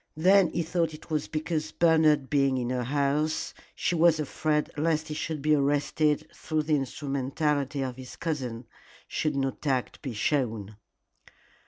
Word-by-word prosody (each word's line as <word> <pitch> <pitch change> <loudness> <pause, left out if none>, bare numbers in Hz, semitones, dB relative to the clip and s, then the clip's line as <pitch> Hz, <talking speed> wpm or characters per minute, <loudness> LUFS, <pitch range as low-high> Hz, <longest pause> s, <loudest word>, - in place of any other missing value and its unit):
Then 185 +2 +5
he 170 - -1
thought 165 -1 -1
it 155 - -15
was 155 -2 0
because 155 0 -2
Bernard 160 -4 +4
being 135 -2 +2
in 125 -1 -2
her 125 -1 -1
house 145 +3 0 0.2
she - - 0
was 165 -1 +4
afraid 150 +1 0
lest 155 0 0
he - - -3
should 150 -1 -4
be 155 0 +4
arrested 145 +1 +1
through 155 -1 -2
the 155 0 +2
instrumentality 140 +1 -1
of 130 -1 -4
his 130 -1 -9
cousin 130 -8 -3 0.4
should 155 -2 -1
not 135 -1 -2
tact 130 -4 -1
be 135 -5 -5
shown. 110 -5 -1
150 Hz, 155 wpm, -28 LUFS, 135-155 Hz, 0.4 s, Then